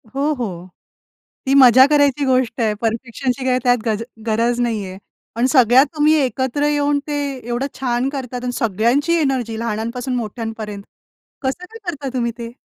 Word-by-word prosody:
हो, 290 Hz, +3 st, +1 dB
हो. 185 Hz, -9 st, -5 dB, 0.8 s
ती 270 Hz, -, +1 dB
मजा 260 Hz, -1 st, +8 dB
करायची 285 Hz, -1 st, +3 dB
गोष्ट 255 Hz, -2 st, +1 dB
आहे, 215 Hz, -2 st, +1 dB
परफेक्शनची 245 Hz, +3 st, -2 dB
काय 255 Hz, 0 st, +2 dB
त्यात 245 Hz, -1 st, +4 dB
गज 220 Hz, 0 st, -1 dB, 0.2 s
गरज 235 Hz, +2 st, +1 dB
नाहीये. 205 Hz, -6 st, -2 dB, 0.4 s
पण 240 Hz, +2 st, +1 dB
सगळ्या 255 Hz, -1 st, +5 dB
तुम्ही 300 Hz, +1 st, +4 dB
एकत्र 260 Hz, +3 st, -1 dB
येऊन 290 Hz, -1 st, +1 dB
ते 295 Hz, -, -2 dB, 0.3 s
एवढं 245 Hz, +3 st, -1 dB
छान 255 Hz, 0 st, 0 dB
करतात 250 Hz, -3 st, -5 dB
आणि 250 Hz, -, -2 dB
सगळ्यांची 235 Hz, -, +1 dB
एनर्जी 255 Hz, -6 st, -1 dB
लहानांपासून 235 Hz, +3 st, -3 dB
मोठ्यांपर्यंत. 220 Hz, -3 st, -5 dB, 0.6 s
कसं 270 Hz, +7 st, -3 dB
काय 445 Hz, +5 st, -12 dB
करता 290 Hz, -4 st, -6 dB
तुम्ही 235 Hz, -2 st, -1 dB
ते? 230 Hz, -1 st, -6 dB
250 Hz, 150 wpm, -19 LUFS, 230-275 Hz, 0.8 s, मजा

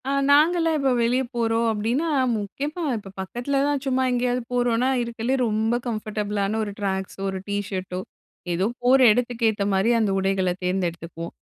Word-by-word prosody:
ஆ -, -, +1 dB, 0.2 s
நாங்கலாம் 325 Hz, +3 st, +4 dB
இப்போ 275 Hz, -2 st, +1 dB
வெளியே 245 Hz, +3 st, +2 dB
போறோம் 230 Hz, 0 st, +1 dB
அப்டின்னா, 230 Hz, +9 st, -1 dB, 0.3 s
முக்கியமா 285 Hz, -, -4 dB
இப்ப 200 Hz, -2 st, -9 dB
பக்கத்துல 240 Hz, +8 st, -2 dB
தான் 290 Hz, -2 st, 0 dB
சும்மா 260 Hz, -1 st, +1 dB
எங்கயாவது 245 Hz, 0 st, 0 dB
போறோம்னா 245 Hz, 0 st, +2 dB
இருக்கறதுலயே 235 Hz, +2 st, -1 dB
ரொம்ப 220 Hz, +2 st, +1 dB
கம்ஃபர்டபிளான 210 Hz, -2 st, -2 dB
1 205 Hz, -, -4 dB
ட்ராக்ஸோ, 190 Hz, -1 st, -3 dB
1 190 Hz, 0 st, -4 dB
டீஷர்டோ, 190 Hz, -2 st, -3 dB, 0.5 s
ஏதோ 180 Hz, +3 st, +1 dB, 0.2 s
போற 255 Hz, +2 st, +5 dB
இடத்துக்கு 235 Hz, 0 st, +1 dB
ஏத்த 210 Hz, -2 st, -1 dB
மாரி 195 Hz, +4 st, +2 dB
அந்த 215 Hz, -3 st, +1 dB
உடைகளை 190 Hz, -1 st, +1 dB
தேர்ந்தெடுத்துக்குவோம். 170 Hz, -2 st, -3 dB
225 Hz, 145 wpm, -24 LUFS, 195-250 Hz, 0.5 s, போற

